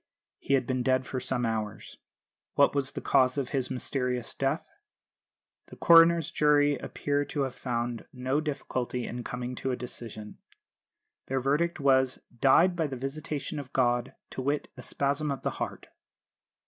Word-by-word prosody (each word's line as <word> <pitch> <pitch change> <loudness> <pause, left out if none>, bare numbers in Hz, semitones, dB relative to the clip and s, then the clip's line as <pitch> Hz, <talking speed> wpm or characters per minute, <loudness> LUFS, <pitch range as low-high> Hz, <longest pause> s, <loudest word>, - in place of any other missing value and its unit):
He 140 - +1
had 130 -2 +1
been 130 0 -1
dead 130 +1 +2
for 130 - -3
some 125 -1 -1
hours. 110 -2 -4 0.6
What 140 - +5
was 140 -2 0
the - - -5
cause 130 +1 +3
of 135 -3 -1
his 135 -3 0
mysterious 125 -2 -1
death? 135 +4 -1 1.0
The - - -12
coroner's 165 -1 +6
jury 145 -1 +4
appear 145 +2 -1
to 145 - -3
have 135 -2 -1
found 120 -2 -3
no 130 +3 -1
difficulty 130 -4 -3
in 120 0 -5
coming 125 +1 -4
to 135 - -2
a 125 - 0
decision. 115 -3 -8 0.9
Their 135 0 0
verdict 150 +7 +1
was, 130 -2 +3 0.2
"Died 170 +8 +5
by 165 -3 0
the 135 -2 -5
visitation 145 +2 -4
of 140 -1 -9
God 120 -2 +1 0.2
to - - -4
wit, 145 +3 -1
a - - -9
spasm 145 +2 -1
of 140 -1 -3
the - - 0
heart." - - -5
130 Hz, 160 wpm, -28 LUFS, 125-145 Hz, 1.0 s, coroner's